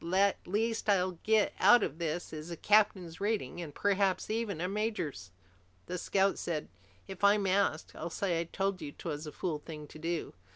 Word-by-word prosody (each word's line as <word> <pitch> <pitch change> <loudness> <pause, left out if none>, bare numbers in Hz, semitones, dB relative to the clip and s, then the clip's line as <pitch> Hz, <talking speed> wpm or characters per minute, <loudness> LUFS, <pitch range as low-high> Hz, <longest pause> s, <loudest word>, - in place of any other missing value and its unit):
The 190 +4 +3
least 220 +3 0
I'll 185 -3 +2
get 220 -1 +3
out 240 -3 +7
of 155 - -3
this 165 +1 -3
is 155 +2 -6
a 170 - -5
captain's 195 -5 +2
rating, 200 - -1
and 160 -3 -6
perhaps 195 +4 +1
even 220 -6 -1
a 180 - -1
major's!" 195 - -2 0.6
The 180 0 -4
scout 195 0 +2
said, 155 -3 -3 0.4
"If 190 0 -9
I'm 200 0 +5
asked, 190 -4 +1
I'll - - -5
say 175 -1 -1
I 170 - -1
told 195 +1 -2
you 145 -2 -5
'twas 150 0 -5
a - - -5
fool 160 -3 -3
thing 150 -1 -8
to 155 - -12
do." 165 0 -3
185 Hz, 190 wpm, -32 LUFS, 165-200 Hz, 0.6 s, out